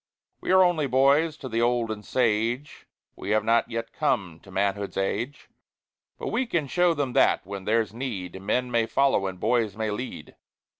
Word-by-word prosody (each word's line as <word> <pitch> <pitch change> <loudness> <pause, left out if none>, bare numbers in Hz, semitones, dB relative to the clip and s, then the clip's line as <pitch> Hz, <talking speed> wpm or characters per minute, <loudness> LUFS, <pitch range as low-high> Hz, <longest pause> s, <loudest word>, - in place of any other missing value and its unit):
"We - - -7
are 185 0 +7
only 170 -5 +2
boys 140 +5 +3
to 135 - -7
the 115 -1 -1
old 120 -1 +1
and 105 -1 -6
sage; 120 +4 -1 0.3
We 95 - -7
have 110 0 +2
not 115 +1 +2
yet 115 0 -4
come 85 -5 -1
to 95 - -17
manhood's 100 +1 -1
age; 115 +8 -2 0.7
"But - - -4
we 260 - 0
can 170 -9 0
show 175 +4 +2
them 140 -4 -2
that, - - +3
when 100 0 -7
there's 110 -1 +1
need, 100 -7 -5
Men 125 +5 -1
may 115 -1 +2
follow 130 -5 +2
and 95 -1 -6
boys 110 -2 +1
may 110 -1 -1
lead." 120 +5 -6
115 Hz, 185 wpm, -26 LUFS, 105-135 Hz, 0.7 s, are